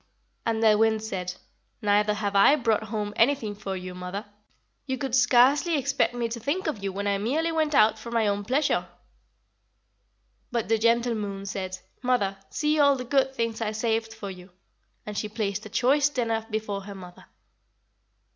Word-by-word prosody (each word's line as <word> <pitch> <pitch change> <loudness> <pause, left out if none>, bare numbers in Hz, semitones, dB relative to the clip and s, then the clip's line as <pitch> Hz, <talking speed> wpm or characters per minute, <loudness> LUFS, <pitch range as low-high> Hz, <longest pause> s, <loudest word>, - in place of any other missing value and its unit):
"And 225 0 0
the 215 -1 +5
Wind 220 -1 +2
said: 180 -4 -4 0.5
'Neither 210 0 +3
have 205 -1 -2
I 200 +9 +7
brought 225 -6 0
home 210 -1 -3
anything 230 -4 +2
for 195 -1 -5
you, 185 0 -7
mother. 180 +3 -6 0.6
You 260 -1 -1
could 270 -3 -4
scarcely 265 +6 +4
expect 270 -2 0
me 240 -1 -1
to 235 +1 -5
think 285 - -2
of 235 -11 -3
you 195 - -1
when 200 +2 -4
I 200 -1 +1
merely 305 +10 0
went 310 -2 0
out 220 -2 +5
for 235 - -8
my 230 -2 +1
own 205 0 0
pleasure.' 270 +7 +1 1.6
"But 235 -3 -2
the 225 -1 +3
gentle 235 +1 +2
Moon 200 -2 -4
said: 190 -1 -4 0.2
'Mother, 245 -6 +1
see 300 0 0
all 285 -1 +5
the 250 -1 -5
good 265 +1 +1
things 230 -1 -2
I 215 -1 -1
saved 225 0 -1
for 220 -3 -7
you,' 180 0 -12 0.6
and 210 - -6
she 210 +1 -2
placed 210 -1 -3
a - - -13
choice 275 +6 +3
dinner 230 -5 -1
before 215 -2 -3
her 200 -1 -8
mother. 180 -2 -12
220 Hz, 180 wpm, -26 LUFS, 205-250 Hz, 1.6 s, I